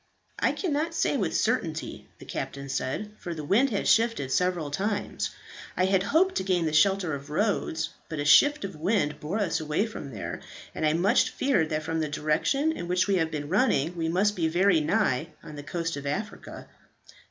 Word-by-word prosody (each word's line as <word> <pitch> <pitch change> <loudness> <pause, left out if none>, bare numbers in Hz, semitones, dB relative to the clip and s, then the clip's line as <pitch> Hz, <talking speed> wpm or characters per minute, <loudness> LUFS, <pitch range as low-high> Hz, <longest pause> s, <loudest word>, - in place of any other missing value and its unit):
"I - - +2
cannot 320 -2 -2
say - - +1
with - - 0
certainty," - - -2
the - - -13
captain 140 0 -5
said, 135 +11 -3
"for 170 -1 -5
the 155 - -6
wind 225 - +3
has 205 -5 -1
shifted 225 - +2
several 175 -3 0
times. 205 +6 -2 0.5
I 185 - +3
had 190 0 +2
hoped 330 - +2
to - - 0
gain 180 -3 +1
the 155 - -1
shelter 180 +1 +3
of 140 +1 -6
Rhodes, 160 -2 0 0.2
but 155 - -5
a 145 - -2
shift 290 - +5
of 190 - -7
wind 155 -2 0
bore 160 +8 -3
us 200 -6 0
away 155 +6 0
from 215 -10 -7
there, 110 -7 -6 0.3
and 155 - 0
I 150 - +2
much 175 +5 +3
fear 260 - +1
that 155 -1 -2
from 160 +1 -2
the 155 -1 -1
direction 155 - +1
in 175 - -5
which 180 +1 +2
we 195 -2 +2
have 160 -2 +1
been 150 -2 -4
running 175 - +1
we 165 -1 -1
must 200 +5 +2
be 165 -3 +1
very 175 0 +3
nigh 160 - +1 0.2
on 155 - -9
the 145 - -7
coast 165 +2 -3
of 140 0 -6
Africa." 205 +9 -5
175 Hz, 200 wpm, -27 LUFS, 150-205 Hz, 0.5 s, shift